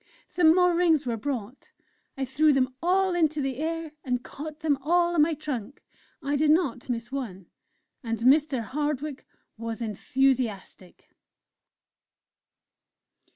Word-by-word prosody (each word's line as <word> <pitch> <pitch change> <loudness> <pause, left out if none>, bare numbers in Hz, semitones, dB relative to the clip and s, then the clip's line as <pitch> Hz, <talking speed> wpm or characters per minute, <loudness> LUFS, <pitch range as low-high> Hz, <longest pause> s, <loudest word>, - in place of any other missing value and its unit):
Some 330 -2 +4
more 360 -1 +4
Rings 335 -4 +3
were 235 -2 -1
brought; 245 0 -5 0.5
I 270 - -1
threw 295 +4 +3
them 260 -1 +1
all 375 +2 +2
into 315 -3 +1
the 270 -3 -2
air 325 0 -3
and 250 -2 -2
caught 305 +1 -8
them 300 -3 +2
all 345 +4 +2
on 330 - +3
my 315 +1 +3
trunk, 275 -5 -6 0.4
I 285 +1 0
did 300 +1 +2
not 300 -7 +1
miss 240 0 -3
one. 215 -10 -5 0.6
And 230 -1 -2
Mr. 265 +1 +3
Hardwick 290 +2 -3 0.3
was 230 0 -5
enthusiastic. 230 -4 -2
280 Hz, 130 wpm, -26 LUFS, 245-315 Hz, 0.6 s, Some